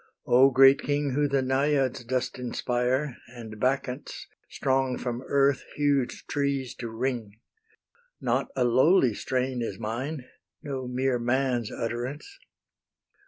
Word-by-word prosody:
O 130 +2 +6
great 135 +1 +6
King 145 -1 -1
Who 145 +3 +1
the 135 -1 +1
Naiads 135 -1 +1
dost 130 +1 -2
inspire, 125 +2 -1
And 115 -3 -10
Bacchants, 130 +2 -2 0.2
strong 130 -2 0
from 120 -1 -4
earth 140 -1 +2
huge 140 -3 0
trees 140 -3 -1
to 120 - -4
wring! 115 -3 -3 0.8
Not - - 0
a 130 - +2
lowly 130 - +4
strain 130 +2 -2
is 115 - -4
mine, 125 +6 -4 0.4
No 135 -4 -4
mere 125 0 0
man's 120 -1 0
utterance. 125 - -5
130 Hz, 120 wpm, -27 LUFS, 120-140 Hz, 0.8 s, O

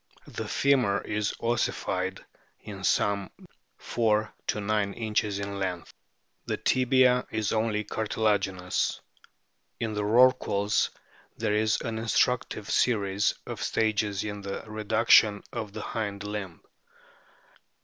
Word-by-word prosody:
The - - -6
femur 125 -8 +2
is 105 0 -2
ossified 95 -5 -1 0.4
is 95 -2 -2
some 100 -1 +1 0.5
4 110 -2 0
to - - 0
9 105 -1 0
inches 105 -3 -1
in 100 0 -4
length. 90 -3 -4 0.5
The - - -1
tibia 130 -1 +3
is 110 -1 -1
only 110 -1 0
cartilaginous. 100 -4 -1 0.8
In 110 -1 -2
the 105 - -1
rorquals 105 -3 +3 0.5
there 105 - 0
is 110 +1 +2
an 110 -1 -3
instructive 115 -1 0
series 100 -4 +2
of - - -6
stages 105 -2 0
in 105 -1 -5
the 100 0 -5
reduc 110 +1 -1
tion 105 -2 +6
of 110 -4 -4
the - - -6
hind 100 -3 -4
limb. 105 -4 -5
105 Hz, 120 wpm, -27 LUFS, 100-110 Hz, 0.8 s, tion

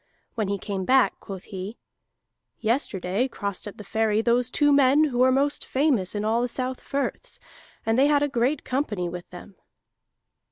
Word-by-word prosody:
When 215 -3 -1
he 200 0 -1
came 195 0 -4
back 260 +5 +3
quoth 190 -2 -8
he: 195 +4 -7 0.8
"Yesterday 220 -2 0
crossed 200 -5 -5
at 205 - -9
the 210 - -8
ferry 220 0 +1
those 240 +1 +2
two 290 +2 +3
men 280 +2 +5
who 250 -5 0
are 260 0 +5
most 280 +2 +1
famous 260 - 0
in 205 0 -2
all 225 +2 +2
the 245 - -1
South 255 +1 -4
Firths, 280 0 -4 0.5
and 225 +2 +2
they 275 - +5
had 290 -1 +3
a - - +2
great 260 +2 0
company 230 -9 -2
with 175 0 -8
them." 180 +2 -12
235 Hz, 175 wpm, -25 LUFS, 200-270 Hz, 0.8 s, men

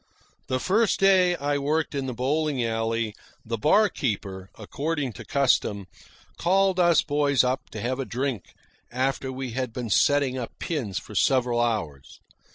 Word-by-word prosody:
The 130 - -1
first 210 - +2
day 185 -2 +4
I 145 -2 -1
worked 155 +3 -1
in 135 -2 -2
the 130 - -3
bowling 140 +1 0
alley, 115 -1 -1 0.3
the 115 +1 -2
barkeeper, 105 - +1
according 140 +4 -3
to - - -9
custom, 120 -7 +1 0.5
called 190 +1 +2
us 170 -2 +4
boys 145 -3 +2
up 130 +1 -2
to 110 - -7
have 130 +4 -2
a 135 - -2
drink 125 -4 -4 0.4
after 130 +1 -1
we 130 -1 -5
had 130 0 -3
been 115 -1 -5
setting 140 +2 +3
up 120 - -7
pins 120 - -3
for - - -7
several 125 -3 +2
hours. 100 - -3
130 Hz, 155 wpm, -25 LUFS, 115-150 Hz, 0.5 s, day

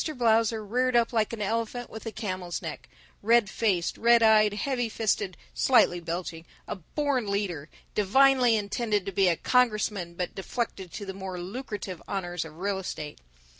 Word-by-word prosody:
Blausser 225 -2 +2
reared 250 +3 +1
up 235 0 +3
like 220 -2 +1
an 225 -3 -3
elephant 230 +3 -2
with 220 +1 -8
a - - -3
camel's 185 -5 -4
neck - - -7 0.3
red 225 -1 +3
faced, 190 -7 0
red 235 0 +5
eyed, 215 -1 +6
heavy 245 0 -1
fisted, 200 -5 -1 0.2
slightly 225 -8 +4
belching 170 -1 -5 0.2
a - - -3
born 255 - -2
leader, 185 -7 -2 0.2
divinely 250 +3 +4
intended 210 -1 -1
to 195 - -3
be 195 0 +3
a 170 - +3
congressman 215 -8 +1
but 180 0 -3
deflected 195 -2 -4
to 205 - -6
the 190 - -5
more 190 -1 -6
lucrative 200 -2 -6
honors 175 -3 -3
of 160 -1 -12
real 195 +2 -1
estate. 150 -5 -6
210 Hz, 165 wpm, -27 LUFS, 185-230 Hz, 0.3 s, eyed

